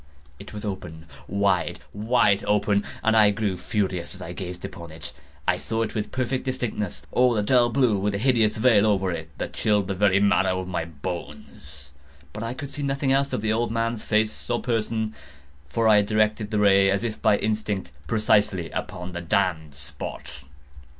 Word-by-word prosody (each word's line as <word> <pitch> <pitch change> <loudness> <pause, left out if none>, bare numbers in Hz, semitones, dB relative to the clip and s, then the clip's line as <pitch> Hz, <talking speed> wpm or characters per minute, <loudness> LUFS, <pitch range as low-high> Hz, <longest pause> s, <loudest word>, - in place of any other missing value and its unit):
It 100 - -10
was 105 0 -7
open—wide, 90 0 -2
wide 105 -1 +2
open—and 105 +2 +1
I 105 -2 +7
grew 100 -2 -1
furious 90 -1 -2
as - - -11
I 85 - -6
gazed 90 -1 -6
upon 85 -2 -8
it. 80 -1 -10 0.3
I - - +3
saw 115 0 -1
it 110 - -4
with 105 -1 -3
perfect 130 0 -1
distinctness—all 120 - 0
a 105 - +1
dull 120 +1 +4
blue, 120 -4 +2
with 100 +1 0
a - - 0
hideous 115 -2 +2
veil 110 -3 +5
over 95 -3 +1
it 80 -2 -5
that - - -4
chilled 105 -2 +1
the 95 - -1
very 100 0 +3
marrow 95 -2 +2
in 90 - -8
my 85 -2 -2
bones; 75 -3 -8 0.4
but 105 - -6
I 115 +2 -3
could 140 +1 -7
see 145 +1 -5
nothing 135 -1 0
else 140 +1 +1
of - - -1
the 110 0 +2
old 120 +2 0
man's 115 0 -1
face 110 +1 0
or 120 0 +1
person: 110 -2 -1 0.6
for 115 +10 +1
I 110 -1 +7
had 105 -1 +2
directed 110 0 +1
the 110 - -1
ray 100 -1 +5
as 100 +3 +1
if 115 -2 -4
by 105 -2 +4
instinct, 105 -4 -2 0.2
precisely 105 -5 +2
upon 90 +1 -5
the 85 -1 -5
damned 85 -5 0
spot. 70 +1 -8
105 Hz, 185 wpm, -25 LUFS, 90-110 Hz, 0.6 s, I